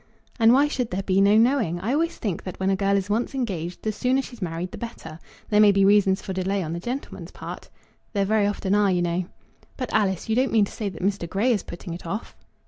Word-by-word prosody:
"And 225 0 +6
why 275 +4 +5
should 250 -5 -2
there 190 +2 -3
be 190 0 +2
no 200 +2 +5
knowing? 225 - +2
I 220 +8 -1
always 330 +3 0
think 200 -7 -3
that 185 - -7
when 190 +1 +1
a - - +2
girl 200 +1 +2
is 195 -1 -2
once 225 +6 -1
engaged 180 -9 -3
the 215 - 0
sooner 255 +5 +1
she's 240 -4 -11
married 175 +1 -3
the - - -8
better. 230 -9 -8 0.3
There 210 - +3
may 210 -1 +7
be 195 0 +3
reasons 195 -1 +4
for 190 - -4
delay 190 +1 -1
on 160 0 -4
the 170 - -3
gentleman's 250 +9 -6
part." - - -9 0.4
"There 200 -2 +1
very 210 0 +2
often 200 -1 -1
are, 205 -1 +4
you 180 -2 +1
know," 175 +1 -1 0.5
"But, 255 -3 -4
Alice, 195 -4 +1
you 220 - +1
don't 260 +2 +2
mean 215 -3 +4
to - - -11
say 210 -3 -3
that 180 -2 -9
Mr. 195 -3 -1
Grey 210 +8 +1
is 210 -5 +1
putting 175 0 -8
it 170 0 -8
off?" 205 +7 -5
200 Hz, 250 wpm, -24 LUFS, 185-225 Hz, 0.5 s, may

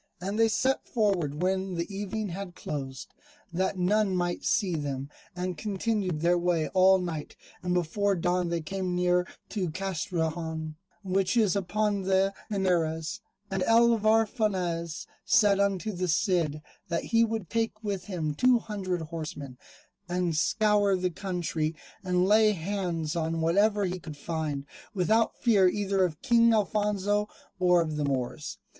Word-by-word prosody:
And 195 +5 -3
they 225 - +6
set 260 +4 0
forward 180 - 0
when 190 0 0
the 170 +4 -4
evening 205 +1 -3
had 180 0 -6
closed, 135 -3 -6 0.4
that 190 +2 0
none 195 +2 +2
might 175 -1 -1
see 195 -5 +1
them, 140 -2 -4 0.2
and 180 -2 -3
continued 200 -4 -1
their 175 +1 +3
way 170 -3 +1
all 190 0 +5
night, 170 -5 -5 0.3
and 180 0 -1
before 195 +4 +1
dawn 180 0 0
they 170 -1 -1
came 185 +2 -3
near 180 0 +2 0.2
to 190 -5 -2
Castrejon, 160 -3 -3 0.3
which 190 +3 +1
is 210 -5 +3
upon 200 +1 0
the 190 +1 +2 0.2
Henares. 175 -2 0 0.3
And 190 -1 -1
Alvar 225 0 +4
Fanez 180 -8 -2 0.2
said 205 -2 +4
unto 200 +1 0
the 185 -1 -2
Cid, 165 -3 +1 0.2
that 170 -2 -1
he 230 0 +3
would 225 -4 -2
take 225 0 -2
with 200 -3 -3
him 165 -6 -2
two 250 +10 +4
hundred 195 -6 -3
horsemen, 155 -5 -7 0.5
and 175 -2 0
scour 205 +3 +3
the 180 -1 -1
country 170 -4 -2 0.3
and 180 -1 +2
lay 215 +1 +5
hands 175 -3 -2
on 165 0 -1
whatever 200 +5 +2
he 180 0 -3
could 155 -3 -9
find, 150 -3 -3 0.3
without 220 +5 +2
fear 205 -6 +4
either 195 0 0
of 160 -4 -2
King 235 -3 +5
Alfonso 210 0 0 0.3
or 180 -1 +4
of 155 -2 -4
the 150 - 0
Moors. 135 +1 -3
185 Hz, 150 wpm, -28 LUFS, 165-205 Hz, 0.5 s, they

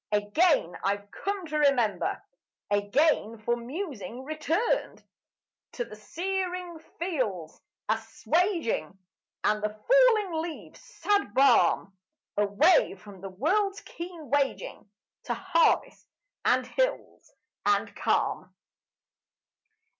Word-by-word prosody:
Again 210 - +2
I've 200 +1 -1
come 400 -2 -3
to 305 -1 -2
remember, 260 -8 +2 0.5
Again 225 +3 +2
for 230 +2 0
musing 250 - -6
returned 310 - -1 0.7
To 240 - -3
the 215 - -11
searing 360 - -4 0.2
fields' 245 - -3 0.3
assuaging, 225 - 0 0.5
And 210 0 +2
the 210 - 0
falling 425 - +3
leaves' 330 -1 -8
sad 405 - -1
balm: 255 -7 +4 0.4
Away 210 - +4
from 195 -1 -14
the 195 - -6
world's 390 - 0
keen 335 -4 -9
waging 280 -6 -1 0.4
To - - -1
harvest 365 -3 +1 0.4
and - - +3
hills - - -2 0.3
and 410 - +1
calm. - - 0
285 Hz, 95 wpm, -28 LUFS, -, 0.7 s, balm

